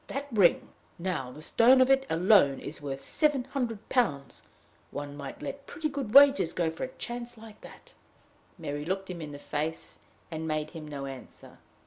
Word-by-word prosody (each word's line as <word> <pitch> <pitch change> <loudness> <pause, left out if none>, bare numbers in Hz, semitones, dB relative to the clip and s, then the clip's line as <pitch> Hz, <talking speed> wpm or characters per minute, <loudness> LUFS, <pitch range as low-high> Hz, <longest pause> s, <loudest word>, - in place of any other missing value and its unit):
That 275 +1 -4
ring, 200 -6 +3 0.3
now, 165 -8 -3
the 150 +4 -11
stone 250 +8 +5
of 255 - +6
it 270 0 +3
alone, 165 -5 +4
is 150 - -7
worth 135 -1 -5
seven 295 -4 +1
hundred 245 -5 -4
pounds: 145 - 0 0.5
one 145 0 -6
might 140 -2 -8
let 280 0 -6
pretty 320 -3 -3
good 270 -5 -5
wages 280 - +7
go 165 -2 0
for 160 - -6
a - - -1
chance 240 0 -6
like 220 -1 -13
that!" - - -14 0.6
Mary 145 -3 -4
looked 190 +3 -3
him 170 -2 -7
in 150 -2 -6
the 145 - -8
face, 155 +2 -4 0.3
and 160 0 -4
made 155 -1 -2
him 160 -3 -8
no 140 -2 -6
answer. 135 -2 -10
180 Hz, 180 wpm, -29 LUFS, 150-250 Hz, 0.6 s, wages